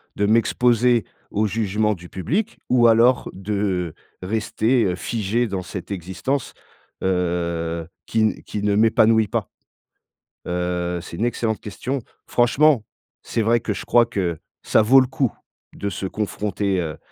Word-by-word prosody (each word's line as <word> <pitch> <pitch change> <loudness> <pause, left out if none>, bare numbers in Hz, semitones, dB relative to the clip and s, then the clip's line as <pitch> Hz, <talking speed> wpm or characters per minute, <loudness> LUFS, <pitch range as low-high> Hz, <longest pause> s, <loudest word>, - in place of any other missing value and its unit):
De 100 - +1
m'exposer 120 +1 +3 0.3
au 105 +1 +1
jugement 105 0 0
du 90 -3 -11
public? 195 - -2
Ou 120 -2 +5
alors, 115 +2 +4
de 95 -3 -2 0.3
rester, 110 +4 +1
heu, 90 -2 0
figé 115 +4 -1
dans 95 -3 -3
cette 90 +1 -7
existence, 95 +9 -3 0.5
heu, 85 -2 -1 0.2
qui 110 - 0
n 110 -1 +1
qui 105 - -5
ne 105 -1 +2
m'épanouit 110 0 +4
pas? - - -2 1.0
Heu, 90 0 -1
c'est 85 - -9
une 115 - 0
excellente 115 -2 -1
question. 125 +7 -4 0.3
Franchement, 125 +1 +3 0.4
c'est 115 - -1
vrai 115 +2 +3
que 110 - -2
je - - -7
crois 120 -1 +5
que 90 -8 -2 0.2
ça - - +4
vaut 130 +5 +6
le 130 - 0
coup, 130 -2 -1 0.4
de 100 - -3
se 95 - -5
confronter, 100 -1 -2
heu, 80 -2 -4
105 Hz, 145 wpm, -22 LUFS, 90-115 Hz, 1.0 s, vaut